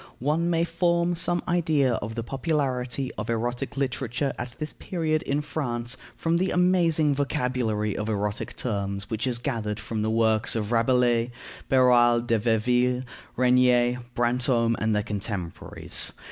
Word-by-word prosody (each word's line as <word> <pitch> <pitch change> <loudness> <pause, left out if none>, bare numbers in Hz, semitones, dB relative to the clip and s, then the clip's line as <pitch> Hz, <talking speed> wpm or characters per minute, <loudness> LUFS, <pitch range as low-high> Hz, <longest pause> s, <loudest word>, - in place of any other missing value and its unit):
One 155 +6 0
may 165 -1 +2
form 170 +1 +1
some 175 0 +1
idea 155 -7 +2
of 110 0 -4
the 115 - -3
popularity 130 -1 -2
of 105 - -4
erotic 120 +4 -2
literature 135 0 -1
at 120 0 -7
this 155 -1 -5
period 160 -4 -1
in 145 +2 -1
France 120 -5 -3 0.2
from 165 +1 0
the 185 +2 +1
amazing 170 -4 +3
vocabulary 125 -6 -1
of 105 +1 -3
erotic 105 -1 -2
terms 100 -3 -3
which 110 +3 -1
is 125 -2 0
gathered 115 -5 -3
from 115 -1 -4
the 110 - 0
works 110 -1 +2
of 105 -1 -2
Rabelais, 120 0 +2 0.4
Beroald 120 -2 +4
de 115 -2 +2
Verville, 125 +3 +1 0.3
Regnier, 125 -1 +4 0.2
Brantome, 120 -1 +2
and 110 0 +1
their 105 - +1
contemporaries. 100 -4 -2
125 Hz, 145 wpm, -26 LUFS, 115-145 Hz, 0.4 s, Beroald